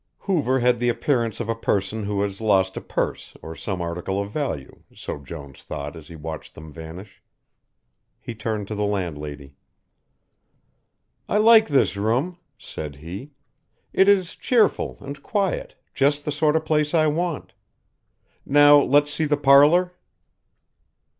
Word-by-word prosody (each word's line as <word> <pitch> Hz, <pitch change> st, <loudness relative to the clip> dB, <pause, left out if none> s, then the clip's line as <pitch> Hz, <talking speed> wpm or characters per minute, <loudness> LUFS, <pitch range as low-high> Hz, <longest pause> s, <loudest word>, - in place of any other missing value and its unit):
Hoover 140 Hz, -, +1 dB
had 120 Hz, -1 st, +3 dB
the 120 Hz, 0 st, +1 dB
appearance 115 Hz, -3 st, 0 dB
of 120 Hz, -, -3 dB
a 115 Hz, -, 0 dB
person 105 Hz, -1 st, -1 dB
who 100 Hz, 0 st, -1 dB
has 100 Hz, +1 st, -4 dB
lost 95 Hz, -3 st, +2 dB
a -, -, -5 dB
purse -, -, -4 dB
or 80 Hz, -, -7 dB
some 95 Hz, 0 st, -4 dB
article 90 Hz, +3 st, -3 dB
of 100 Hz, 0 st, -4 dB
value, 135 Hz, -, -4 dB
so -, -, -6 dB
Jones 70 Hz, -1 st, -10 dB
thought 70 Hz, +3 st, -6 dB
as 80 Hz, -3 st, -12 dB
he 85 Hz, -, -11 dB
watched 80 Hz, 0 st, -8 dB
them 80 Hz, -1 st, -11 dB
vanish. 85 Hz, +5 st, -10 dB, 1.0 s
He 120 Hz, -, -7 dB
turned 110 Hz, -2 st, -4 dB
to -, -, -3 dB
the 105 Hz, 0 st, -2 dB
landlady. 75 Hz, -8 st, -4 dB, 1.7 s
"I -, -, +2 dB
like 220 Hz, +1 st, +6 dB
this 140 Hz, -7 st, +2 dB
room," 125 Hz, -, -1 dB, 0.2 s
said 75 Hz, -10 st, -8 dB
he, 90 Hz, -, -9 dB, 0.6 s
"it 190 Hz, +1 st, +5 dB
is 185 Hz, -3 st, +2 dB
cheerful 230 Hz, -5 st, +1 dB
and 140 Hz, 0 st, -8 dB
quiet, 195 Hz, +2 st, -2 dB, 0.2 s
just 145 Hz, +1 st, +1 dB
the 150 Hz, -, -1 dB
sort 150 Hz, +1 st, +1 dB
of 160 Hz, -, 0 dB
place 150 Hz, +1 st, +1 dB
I 155 Hz, -1 st, +4 dB
want. 165 Hz, +1 st, -2 dB, 0.9 s
Now 145 Hz, +1 st, +6 dB
let's 145 Hz, +2 st, +3 dB
see 155 Hz, -, 0 dB
the 150 Hz, -1 st, +1 dB
parlour." 145 Hz, +6 st, +5 dB
115 Hz, 150 wpm, -23 LUFS, 95-150 Hz, 1.7 s, like